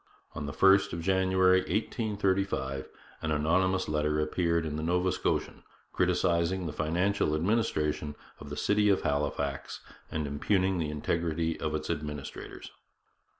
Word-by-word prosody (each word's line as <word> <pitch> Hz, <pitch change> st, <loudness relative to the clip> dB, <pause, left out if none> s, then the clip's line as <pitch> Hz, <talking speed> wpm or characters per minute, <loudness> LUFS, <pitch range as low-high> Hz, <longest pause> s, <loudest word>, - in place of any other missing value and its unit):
On 75 Hz, -, -5 dB
the -, -, -3 dB
1st 95 Hz, +5 st, +4 dB
of 85 Hz, -, -3 dB
January 95 Hz, 0 st, +3 dB
1835 100 Hz, -, -1 dB, 0.3 s
an 80 Hz, -, -2 dB
anonymous 85 Hz, +5 st, +1 dB
letter 75 Hz, 0 st, 0 dB
appeared 85 Hz, +1 st, +1 dB
in 75 Hz, -1 st, -3 dB
the 80 Hz, -, -3 dB
Nova 90 Hz, +3 st, +1 dB
Scotian -, -, -1 dB, 0.3 s
criticizing 85 Hz, +2 st, +1 dB
the 75 Hz, -, -4 dB
financial 85 Hz, +2 st, +1 dB
administration 75 Hz, -6 st, 0 dB, 0.2 s
of 70 Hz, -, -9 dB
the 75 Hz, -, -6 dB
city 105 Hz, 0 st, +2 dB
of 100 Hz, -, +3 dB
Halifax 70 Hz, -1 st, -2 dB, 0.3 s
and 75 Hz, -2 st, -2 dB
impugning 95 Hz, +6 st, +1 dB
the 80 Hz, -2 st, -1 dB
integrity 80 Hz, +2 st, -1 dB
of 75 Hz, -1 st, -2 dB
its 75 Hz, +1 st, -2 dB
administrators. 75 Hz, -3 st, -6 dB
85 Hz, 135 wpm, -29 LUFS, 75-95 Hz, 0.3 s, 1st